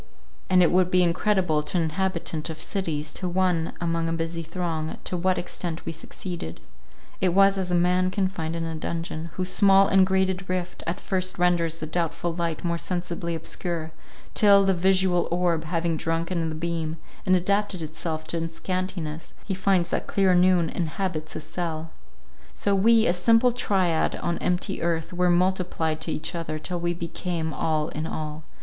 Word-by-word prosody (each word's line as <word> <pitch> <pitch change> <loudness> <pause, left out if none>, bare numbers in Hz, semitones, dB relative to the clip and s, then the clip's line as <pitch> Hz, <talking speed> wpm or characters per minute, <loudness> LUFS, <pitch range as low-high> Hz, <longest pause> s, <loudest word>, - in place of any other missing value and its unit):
And 185 -1 +6
it 170 - +4
would 180 0 +3
be 185 0 +4
incredible 175 -2 +2
to 150 - -2
an 170 - +2
inhabitant 165 -1 -2
of 160 -1 -6
cities, 155 -6 -2
to 185 - -3
one 175 -2 +1
among 165 -1 0
a - - -1
busy 165 0 -2
throng, 165 -1 -3
to - - -2
what 185 +1 +1
extent 175 -2 -4
we - - -2
succeeded. 165 - -6 0.6
It 180 -1 +2
was 195 0 +6
as 190 -2 -2
a 180 - +2
man 180 +1 +3
confined 185 -4 -2
in 165 - -2
a 165 - -3
dungeon, 165 0 -4
whose 185 0 0
small 195 -1 +6
and 190 0 +5
grated 190 0 0
rift 180 -1 -3
at 170 - -2
first 185 -1 -1
renders 175 -2 +2
the 155 - -5
doubtful 170 +1 -2
light 170 -2 -2
more 170 -1 -1
sensibly 175 -1 -3
obscure, 165 0 -3 0.4
till, 200 -2 +6
the 195 - +4
visual 185 0 +2
orb 170 -2 +1
having 165 0 -1
drunk 165 +2 -1
in 165 -3 0
the 155 - -4
beam, 165 -1 -3 0.3
and 185 -1 +4
adapted 200 0 0
itself 155 0 -4
to 165 -1 -1
its 165 0 -5
scantiness, 180 -4 -4
he 195 - -2
finds 185 -2 +2
that - - -2
clear 195 -2 +3
noon 180 -1 +4
inhabits 165 -1 -3
his - - -5
cell. 165 -2 -4 0.6
So 200 - +1
we, 225 +3 +5
a 175 - +3
simple 230 +7 +4
triad 190 -8 +1
on 170 -1 -2
empty 180 +2 -1
earth, 165 0 -1
were 180 0 +2
multiplied 175 -3 +1
to 160 - -2
each 155 - -3
other, 165 -2 -3
till 175 +3 -3
we 175 0 -1
became 170 -1 -3
all 155 -1 0
in 155 +1 -4
all. 155 -1 -5
175 Hz, 180 wpm, -25 LUFS, 165-185 Hz, 0.6 s, And